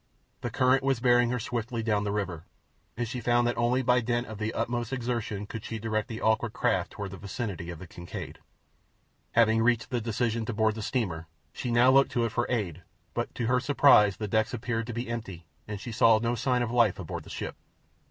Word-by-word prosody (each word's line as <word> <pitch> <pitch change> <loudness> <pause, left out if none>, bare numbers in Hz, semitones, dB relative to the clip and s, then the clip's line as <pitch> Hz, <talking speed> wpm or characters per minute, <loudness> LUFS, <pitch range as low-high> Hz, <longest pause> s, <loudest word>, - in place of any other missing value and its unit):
The - - -2
current 130 +1 +3
was 135 -2 +1
bearing 120 0 +4
her 125 - 0
swiftly 115 0 -3
down 105 -2 +1
the 100 - -1
river, 95 -6 -3 0.5
and 120 -1 -1
she 120 +2 -4
found 120 +1 +3
that 120 - +1
only 125 +2 +1
by 125 0 +4
dint 120 +1 0
of 110 -3 -8
the 110 +1 -1
utmost 120 +1 -2
exertion 115 -5 -2
could 110 +1 -7
she 115 - -4
direct 110 -1 -2
the 110 -1 -6
awkward 110 +1 +1
craft - - 0
toward 100 -2 -5
the 95 - -8
vicinity 100 -5 -5
of 85 - -6
the 95 - -9
Kincaid. 85 0 -8 0.9
Having 115 -1 +4
reached 120 +1 +1
the 120 -2 0
decision 115 0 -1
to 115 - -3
board 110 0 +2
the 110 - -6
steamer, 95 -9 -2 0.3
she 125 - -4
now 120 +2 +5
looked 135 +1 +5
to 120 -1 +2
it 115 - -2
for - - 0
aid, 95 -9 -2 0.3
but - - -3
to 120 - -2
her 125 +2 +3
surprise 125 -7 +5
the 105 - -3
decks 110 +3 +1
appeared 115 -1 -2
to 120 - -4
be 120 +2 -3
empty 100 -8 -6 0.2
and 105 -1 -5
she 120 - -6
saw 115 0 +5
no 115 +2 0
sign 125 +1 +1
of 115 - -3
life 120 -5 +3
aboard - - -5
the - - -14
ship. - - -5
115 Hz, 220 wpm, -28 LUFS, 105-120 Hz, 0.9 s, now